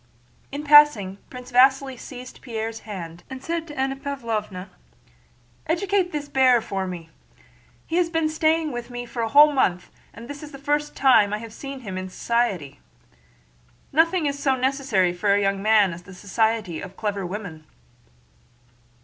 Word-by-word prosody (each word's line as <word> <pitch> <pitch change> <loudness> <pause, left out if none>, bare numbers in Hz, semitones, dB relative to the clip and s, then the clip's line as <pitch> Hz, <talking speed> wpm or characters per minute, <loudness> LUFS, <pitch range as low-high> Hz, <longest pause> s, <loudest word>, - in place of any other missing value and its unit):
In 285 +2 -5
passing 295 -11 +6
Prince 250 0 -10
Vasíli 265 +1 +4
seized 250 +1 -10
Pierre's 225 -2 -5
hand 170 -4 -7
and 265 0 -8
said 335 0 -3
to 295 -2 -10
Anna 270 0 0
Pávlovna: 225 -9 -4 1.0
"Educate 365 +2 0
this 295 -1 -4
bear 260 -3 +4
for 195 -4 -4
me! 170 -3 -8 0.7
He 330 - -2
has 350 -2 +2
been 325 -1 +1
staying 315 0 +1
with 240 -1 -6
me 245 0 -5
a 235 -1 -3
whole 295 +5 +7
month 180 -10 0 0.2
and 230 +2 -11
this 285 +1 -8
is 300 -1 -9
the 275 - -9
first 295 +1 -1
time 230 -7 +5
I - - 0
have 225 0 -9
seen 275 +1 -8
him 190 -5 -5
in 185 0 -6
society. 185 - -1 1.1
Nothing 330 +2 +3
is 280 0 -1
so 270 -2 +2
necessary 255 -9 +1
for 200 +3 +2
a - - +2
young 195 0 0
man 210 -3 +4
as 170 - -9
the 185 +1 -13
society 205 -2 -1
of 185 - -10
clever 205 -2 -2
women." 175 -5 -7
245 Hz, 165 wpm, -23 LUFS, 200-285 Hz, 1.1 s, whole